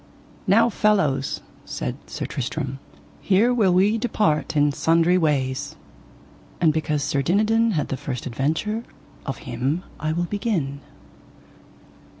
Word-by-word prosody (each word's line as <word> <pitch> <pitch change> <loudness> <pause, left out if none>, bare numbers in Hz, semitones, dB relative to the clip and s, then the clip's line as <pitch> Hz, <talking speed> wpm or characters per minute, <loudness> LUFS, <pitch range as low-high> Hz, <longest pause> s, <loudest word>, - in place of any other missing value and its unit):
Now 230 +5 +5
fellows, 155 - +1 0.2
said - - -4
Sir - - -4
Tristram, 135 +1 -4 0.4
here 210 +6 +3
will 210 -6 +3
we 200 +5 +3
depart 165 -10 0
in 145 0 +4
sundry 165 +4 +3
ways. 145 -4 0 0.8
And 160 -3 +4
because 150 -2 -1
Sir 140 0 0
Dinadan 215 +8 +2
had 150 -5 -1
the 135 - -2
first 130 -2 -5
adventure 160 - -1 0.4
of 135 - -3
him 130 +8 -1 0.2
I 155 +1 -1
will 170 +2 0
begin. 175 -9 -2
160 Hz, 125 wpm, -23 LUFS, 140-205 Hz, 0.8 s, Now